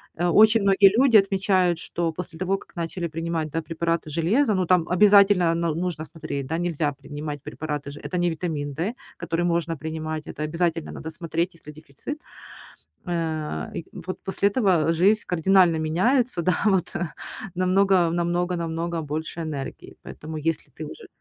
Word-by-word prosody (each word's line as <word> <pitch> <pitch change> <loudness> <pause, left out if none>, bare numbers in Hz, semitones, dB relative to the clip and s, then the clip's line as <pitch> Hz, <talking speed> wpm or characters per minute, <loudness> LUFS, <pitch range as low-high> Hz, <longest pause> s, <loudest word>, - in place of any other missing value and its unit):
Э 175 +2 0
очень 215 +5 +6
многие 195 0 +6
люди 260 -3 +5
отмечают, 190 -3 +2
что 170 -1 -2
после 170 0 -7
того, 190 +1 0
как - - -17
начали 170 +1 -3
принимать, 165 -1 -3
да, 165 +2 -1
препараты 165 0 -2
железа, 200 - +2
ну, 185 -2 +1
там 175 -1 +3
обязательно 195 -2 +5
но 170 -2 0
нужно 170 -2 -3
смотреть, 155 -4 -5
да. 160 - -2
Нельзя 165 -4 0
принимать 145 +1 -7
препараты 150 -1 -5
же 145 - -10
это 180 - -4
не 175 0 +2
витамин 155 -4 -3
D, 175 - -2 0.2
который 170 0 -1
можно 170 -1 0
принимать. 155 0 -5
Это 150 - -5
обязательно 165 +1 -1
надо 160 - -7
смотреть, 165 +2 -2
есть 165 - -19
ли 150 - -8
дефицит. 155 - -8 0.9
Э, 160 - -3
и 165 - -5 0.2
вот 185 - -5
после 200 +1 +1
этого 185 -8 +2
жизнь 200 +6 +3
кардинально 180 0 +4
меняется, 185 - +1
да. 185 - +3
Вот, 190 -4 +1
э, 175 - -1 0.5
намного, 185 -1 +3
намного, 175 +1 0
намного 165 0 -3
больше 155 +2 -4
энергии. 150 -4 -6
Поэтому 155 +1 -8
если 155 +1 -2
ты 155 - -8
уже - - -10
170 Hz, 165 wpm, -24 LUFS, 155-185 Hz, 0.9 s, очень